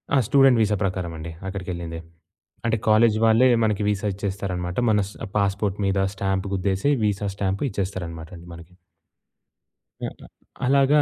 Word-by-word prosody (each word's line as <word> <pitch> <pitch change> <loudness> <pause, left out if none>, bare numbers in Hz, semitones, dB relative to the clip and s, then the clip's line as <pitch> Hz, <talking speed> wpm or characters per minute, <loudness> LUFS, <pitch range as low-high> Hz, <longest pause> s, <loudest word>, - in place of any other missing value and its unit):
ఆ! - - +5
Student 135 -3 +5
visa 105 -1 +2
ప్రకారమండి 85 -4 -3 0.2
అక్కడికెళ్ళింది. 90 -4 -5 0.7
అంటే 115 0 +2
college 110 0 +5
వాళ్ళే 115 +3 +5 0.2
మనకి 105 -1 +1
వీసా 105 0 -1
ఇచ్చేస్తారనమాట. 95 -2 -3 0.2
మన 105 -1 +3
స్ - - -13 0.2
పాస్‌పోర్ట్ 100 0 0
మీద 95 0 +1 0.2
స్టాంప్ 95 0 -1
గుద్దేసి, 95 +7 +1
వీసా 105 -1 0
స్టాంప్ 100 +2 -1
ఇచ్చేస్తారనమాటండి 85 -4 -5
మనకి. 85 +1 -13 1.3
హ్మ్. - - -4
ఆహ్, - - -16 0.4
అలాగా 140 +3 +4
100 Hz, 130 wpm, -24 LUFS, 90-110 Hz, 1.3 s, ఆ